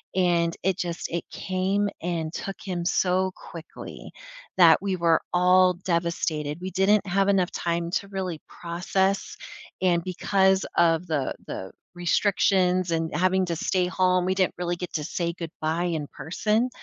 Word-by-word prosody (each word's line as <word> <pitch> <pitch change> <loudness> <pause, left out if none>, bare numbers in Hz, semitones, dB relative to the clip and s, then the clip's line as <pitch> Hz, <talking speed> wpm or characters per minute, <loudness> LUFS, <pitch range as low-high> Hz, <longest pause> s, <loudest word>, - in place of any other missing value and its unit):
and 170 -2 +2
it 190 -2 +2
just 170 -1 -3
it 170 0 -2
came 195 +2 -1
and 165 -2 -3
took 195 +1 -5
him 180 -3 -3
so 185 +1 +1
quickly 165 -1 -10 0.5
that 170 -2 +7
we 195 -1 -1
were 170 -2 +3
all 180 +1 +5
devastated, 170 -4 -2
we 185 - -4
didn't 195 +3 +3
have 195 +2 +2
enough 190 -3 +2
time 170 0 -2
to 200 +1 -1
really 185 -5 -4
process, 190 +3 -1 0.5
and 175 -2 +2
because 190 +1 +2
of 165 +1 +3
the 150 -5 -1
the 95 - -6 0.2
restrictions 180 0 +2
and 165 -1 -1
having 185 +1 +2
to 170 -1 -2
stay 180 +3 0
home, 185 -1 +2
we 185 +1 0
didn't 185 -1 +1
really 175 0 -1
get 180 0 -6
to 155 - -2
say 170 +2 -2
goodbye 165 0 -2
in 150 -2 -5
person, 215 - -1
180 Hz, 155 wpm, -25 LUFS, 170-190 Hz, 0.5 s, that